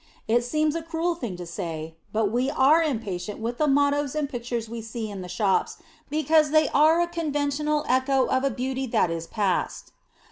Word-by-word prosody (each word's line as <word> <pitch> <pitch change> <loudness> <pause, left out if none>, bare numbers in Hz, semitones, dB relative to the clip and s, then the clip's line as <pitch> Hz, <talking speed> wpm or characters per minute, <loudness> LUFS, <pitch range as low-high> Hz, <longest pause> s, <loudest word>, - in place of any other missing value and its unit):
It 240 +2 +3
seems 305 +4 +1
a 330 - -2
cruel 330 +1 -1
thing 240 - -5
to 175 - -7
say, 165 -2 -5 0.2
but 215 -2 +1
we 250 +3 +1
are 290 +3 +4
impatient 210 - -3
with 235 +2 -4
the 305 - +3
mottoes 285 0 +2
and 300 -2 0
pictures 240 -3 -4
we 230 +1 -6
see 220 -1 -5
in 195 -2 -6
the 180 - -8
shops 195 0 0 0.3
because 310 0 +3
they 310 +1 +4
are 310 +4 +4
a 345 - +1
conventional 300 -2 -1
echo 260 +1 +2
of 260 0 0
a 275 - +2
beauty 260 +2 -3
that 180 -6 +1
is 165 0 -4
past. 200 -4 -1
260 Hz, 190 wpm, -25 LUFS, 220-300 Hz, 0.3 s, are